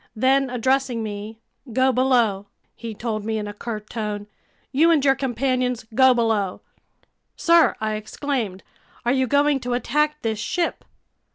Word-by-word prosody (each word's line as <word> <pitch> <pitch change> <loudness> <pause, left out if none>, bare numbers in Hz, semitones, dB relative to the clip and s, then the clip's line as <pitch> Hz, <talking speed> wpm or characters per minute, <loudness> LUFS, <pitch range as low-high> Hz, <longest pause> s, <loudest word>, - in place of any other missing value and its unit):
Then, 265 +3 +2
addressing 250 -1 0
me: 210 +1 -6 0.3
"Go 260 +3 +3
below!" 240 -6 +2 0.3
he 225 -1 -7
told 215 -1 -3
me 220 +1 -2
in 210 -1 -3
a 205 - -6
curt 210 0 -6
tone. 210 -3 -4 0.5
"You 305 +5 +4
and 305 -4 +3
your 270 - +6
companions, 255 -2 -1
go 260 +1 +5
below!" 220 -5 0 0.7
"Sir," 335 -1 +4
I 215 0 -1
exclaimed, 215 -2 -3 0.4
"are 240 - +3
you 260 -1 +1
going 285 +1 +3
to 245 -1 -3
attack 300 +5 0
this 220 -2 -1
ship?" 340 +10 -2
245 Hz, 150 wpm, -23 LUFS, 215-270 Hz, 0.7 s, your